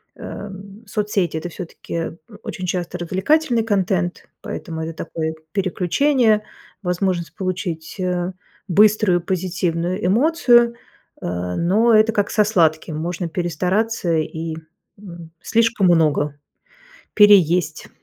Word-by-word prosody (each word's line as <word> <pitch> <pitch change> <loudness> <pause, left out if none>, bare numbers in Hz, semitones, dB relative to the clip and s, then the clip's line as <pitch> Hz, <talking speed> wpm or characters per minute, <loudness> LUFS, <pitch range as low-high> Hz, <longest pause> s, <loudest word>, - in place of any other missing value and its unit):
эм, 200 +2 -9
соцсети- 205 -7 -1
это 175 +2 -5
всё-таки 165 -1 -6 0.3
очень 185 - -5
часто 180 0 -3
развлекательный 230 - +1
контент, 190 -4 -1
поэтому 160 -1 -6
это 160 +1 -4
такое 160 -1 -3 0.2
переключение, 210 - +2 0.4
возможность 180 -2 -1
получить, 180 -4 -4
э, 180 0 -1 0.4
быструю 205 -1 +4
позитивную 180 0 -2
эмоцию, 240 - +4 0.5
э, - - -6 0.3
но 215 +7 +3
это, 220 +1 +5
как 205 -1 0
со 210 - +4
сладким, 160 -6 +1
можно 170 +1 -3
перестараться 180 +2 0
и, 160 +1 -3 0.4
м, 170 -5 -11
слишком 230 -4 +2
много 150 -4 +2 0.8
переесть. 180 -6 +4
185 Hz, 105 wpm, -21 LUFS, 170-210 Hz, 0.8 s, это